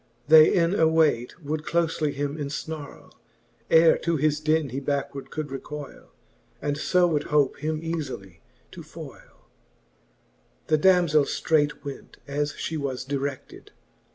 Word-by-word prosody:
They 155 0 +8
in 170 -1 +2
awayt 160 - +2
would 155 +1 -3
cloiely 165 -3 0
him 140 +1 -3
eniharlc, 150 0 -6 0.6
Ere 165 0 +6
to 170 -1 0
his 150 +1 +1
den 155 -1 +1
he 130 +3 -4
backward 140 0 -3
could 155 -1 -5
recoyle, 145 +1 -8 0.5
And 145 -1 -2
fo 180 +3 +3
would 150 -4 0
hope 145 -3 +1
him 155 0 -3
eafily 130 - -5 0.3
to - - -10
foyle. - - -13 1.2
The 155 - +3
damzell 170 -5 +4
ftraight 150 -2 0
went, 140 -2 -9
as 145 +1 -1
fhe 160 -1 -4
was 130 -2 -4
dire<9:ed. 140 0 -5
150 Hz, 130 wpm, -25 LUFS, 140-160 Hz, 1.2 s, They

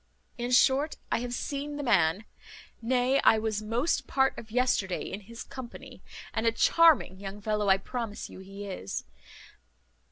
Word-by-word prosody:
"In 240 +1 -2
short, 270 +4 +3
I - - +2
have 245 0 -4
seen 285 +3 -4
the 290 - -4
man, 195 - +2 0.6
nay, 250 +3 +2
I 220 - +6
was 215 -1 -1
most 235 +9 0
part 265 0 +2
of 220 - -10
yesterday 220 -6 +1
in 195 - -5
his 230 +3 -10
company, 255 -3 -10 0.3
and 225 +1 0
a - - +5
charming 310 - +4
young 200 +1 -7
fellow 210 -1 0
I 190 - +6
promise 225 +1 -5
you - - -12
he 195 +2 -9
is. 185 - -5
230 Hz, 160 wpm, -29 LUFS, 200-255 Hz, 0.6 s, I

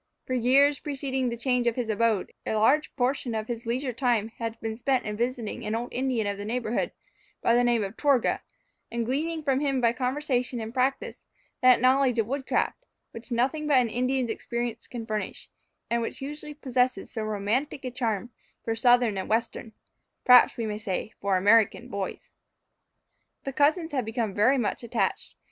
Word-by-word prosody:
For 255 - -3
years 270 +4 +4
preceding 270 -3 -2
the 235 - -4
change 250 0 +1
of 235 - +2
his 245 -3 -2
abode, 220 -2 0
a - - -2
large 260 +8 +3
portion 250 -2 0
of 215 0 -3
his 235 -1 -5
leisure 250 +2 -1
time 230 -3 +1
had 230 -1 -4
been 225 -1 -4
spent 255 +2 0
in 210 -1 -3
visiting 235 -1 -3
an 215 +1 -2
old 240 +2 -4
Indian 250 -3 0
of 200 0 -3
the - - -4
neighbourhood, 230 +1 -1 0.5
by 235 - +4
the 245 +1 +4
name 240 -3 +2
of 195 +2 -5
Torgah, 280 -5 +2 0.5
and 235 0 -1
gleaning 310 +6 -2
from 270 -2 +1
him 275 -2 0
by 235 -1 +3
conversation 250 -1 -1
and 225 0 -6
practice, 265 +1 -1 0.4
that 255 -1 +6
knowledge 255 0 +3
of 225 - +2
wood 265 +3 -4
craft, - - 0 0.3
which 230 +2 -10
nothing 265 +6 0
but 290 -3 +4
an 245 -2 +3
Indian's 250 +1 0
experience 235 0 -4
can 235 -2 -6
furnish, 215 -1 -5 0.4
and 235 0 0
which 230 - -4
usually 295 +2 -7
possesses 255 -3 0
so 225 - -4
romantic 215 +7 -2
a 255 - -3
charm 235 -2 -2 0.3
for 225 - 0
Southern 245 -3 +3
and - - -5
Western 225 +1 -1 0.5
(perhaps 250 -1 +7
we 230 - -2
may 210 -1 -3
say 215 0 -4
for 195 -1 +2
American) 220 +5 +3
boys. 200 -4 -5 1.1
The 275 - -4
cousins 315 +4 +2
had 260 -5 -1
become 225 -2 -2
very 235 +8 +4
much 235 -5 -1
attached. 225 -5 -2
245 Hz, 185 wpm, -27 LUFS, 225-265 Hz, 1.1 s, perhaps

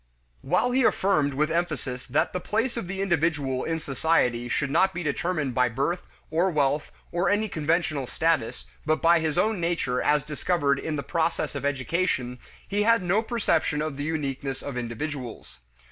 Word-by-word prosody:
While 245 +3 +1
he 260 +2 +3
affirmed 155 - +2
with 150 +3 +1
emphasis 155 -7 -2
that 155 +6 +1
the 180 - -1
place 225 +7 -1
of 230 -7 -4
the 195 +1 -2
individual 150 -7 0
in 165 0 -1
society 130 -5 +1
should 140 +3 0
not 190 +5 +3
be 175 - -3
determined 155 -2 -1
by 125 0 +3
birth 140 +9 -2 0.2
or 170 +4 +2
wealth 145 -2 +1 0.2
or 175 +1 +1
any 210 +2 +2
conventional 155 -5 0
status, 130 - 0 0.2
but 155 - +1
by 170 0 +5
his 160 0 -1
own 215 +2 +2
nature 165 -7 0
as 150 -1 +2
discovered 150 -1 0
in 155 - -3
the 140 - -3
process 165 -2 -1
of 140 -1 -4
education, 130 -2 -1 0.3
he 205 +1 0
had 230 -1 +4
no 185 +5 +2
perception 205 -10 0
of 155 -2 -2
the 145 - -4
uniqueness 140 -3 -3
of 140 - -5
individuals. 120 - -5
155 Hz, 175 wpm, -26 LUFS, 140-175 Hz, 0.3 s, by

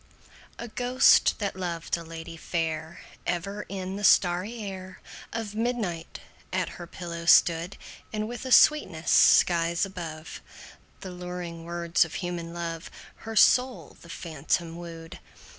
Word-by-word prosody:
A 235 - -6
ghost, 245 +3 +4
that 200 -3 -3
loved 175 -3 -3
a 170 - -7
lady 165 0 -8
fair, 160 -1 -3 0.3
Ever 195 +4 -3
in 190 0 -5
the 205 - -6
starry 185 +4 +3
air 190 -3 -7 0.3
Of 225 -3 -4
midnight 215 -8 -3 0.3
at 185 0 -1
her 175 - -9
pillow 170 -1 -7
stood; 170 +2 +4 0.3
And, 215 0 -2
with 240 +2 -6
a 260 - -5
sweetness 185 - +4
skies 170 +1 +5
above 165 -5 -8 0.6
The 190 - -7
luring 180 -2 -7
words 170 0 +1
of 165 - -8
human 175 -2 -4
love, 170 -1 -5 0.3
Her 225 0 -8
soul 250 +3 +3
the 170 - -14
phantom 165 0 -3
wooed. 165 -1 -9
175 Hz, 135 wpm, -27 LUFS, 165-200 Hz, 0.6 s, skies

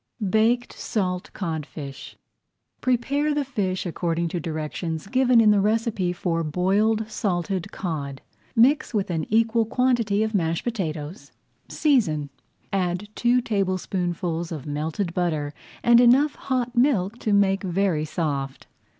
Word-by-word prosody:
BAKED 230 +3 +2
SALT 180 -4 -2
CODFISH 155 -5 -6 0.6
Prepare 280 +4 +1
the 290 -1 0
fish 195 -9 -2
according 170 -1 -1
to 175 - -3
directions 160 0 -4
given 255 +2 +3
in 215 -2 +6
the 205 -1 +4
recipe 215 -3 0
for 175 -2 -1
Boiled 200 +7 +1
Salted 185 -4 -2
Cod. 140 -6 -4 0.4
Mix 265 +2 +3
with 200 -3 0
an 160 -3 -2
equal 225 +1 +3
quantity 230 -3 +1
of 220 0 -2
mashed 165 -4 0
potatoes, 170 -5 -4 0.4
season, 160 - +1 0.4
add 185 +1 -1
two 245 +2 +2
tablespoonfuls 180 -5 -2
of 150 -5 -5
melted 155 +5 -3
butter 155 -5 -1 0.3
and 235 0 +6
enough 270 +5 +5
hot 250 -2 -2
milk 240 -4 +2
to 215 - -1
make 195 -1 +3
very 185 -4 0
soft. 145 -4 -3
195 Hz, 125 wpm, -24 LUFS, 165-230 Hz, 0.6 s, in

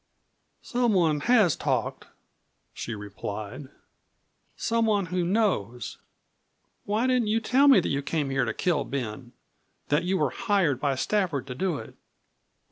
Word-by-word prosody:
"Someone 190 -11 +2
has 215 -9 +5
talked," - - -2 0.7
she 115 - -5
replied; 105 +5 -7 0.9
"someone 220 -4 +1
who 180 +1 -1
knows. 145 - -1 0.9
Why 215 +4 0
didn't 250 -3 +2
you 220 +2 +2
tell 260 +5 +3
me 270 -7 +8
that - - -2
you 140 - 0
came 145 -1 -2
here 135 -2 +1
to 110 - -1
kill 160 +2 0
Ben? 125 -2 -5 0.6
That 145 +2 +2
you 185 +2 0
were - - +1
hired 195 - +1
by 140 -1 0
Stafford 170 -4 0
to 130 - -6
do 170 +4 -1
it?" 110 - -9
170 Hz, 135 wpm, -27 LUFS, 130-215 Hz, 0.9 s, me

